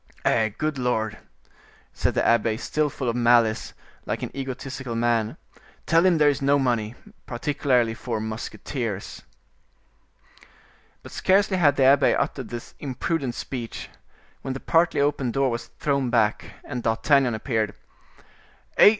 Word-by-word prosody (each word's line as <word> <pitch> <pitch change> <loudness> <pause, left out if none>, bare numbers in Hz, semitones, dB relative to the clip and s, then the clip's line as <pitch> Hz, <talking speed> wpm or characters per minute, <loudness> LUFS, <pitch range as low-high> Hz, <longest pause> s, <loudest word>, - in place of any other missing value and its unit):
"Eh! 110 -1 +3
good 155 -3 -2
Lord!" 110 -4 -1 0.7
said - - -1
the - - +1
abbe, 115 -1 +3
still 150 +5 0
full 130 -2 -5
of 115 - 0
malice, 120 -2 +3 0.3
like - - -2
an - - -6
egotistical 130 -2 -5
man; 115 -2 0 0.5
"tell 165 +1 +4
him 185 -3 +4
there 150 -1 +4
is 145 -1 +2
no 140 +1 +4
money, 120 -4 0 0.3
particularly 125 -2 +1
for 115 0 -4
musketeers." 110 0 -5 1.8
But - - -11
scarcely 195 0 +2
had 145 -5 +4
the 135 - +2
abbe 135 +1 +5
uttered 140 -3 -2
this 120 -1 -7
imprudent 135 -1 -2
speech, 120 -4 -6 0.5
when 135 -1 -4
the - - -4
partly 165 +4 +2
open 140 -3 +1
door 135 +2 +1
was 120 +1 -4
thrown 140 -3 -1
back, 110 -3 +2 0.2
and 125 -4 -5
D'Artagnan 120 +2 +2
appeared. 110 -2 -1 1.0
"Eh! - - +9
125 Hz, 140 wpm, -24 LUFS, 115-140 Hz, 1.8 s, Eh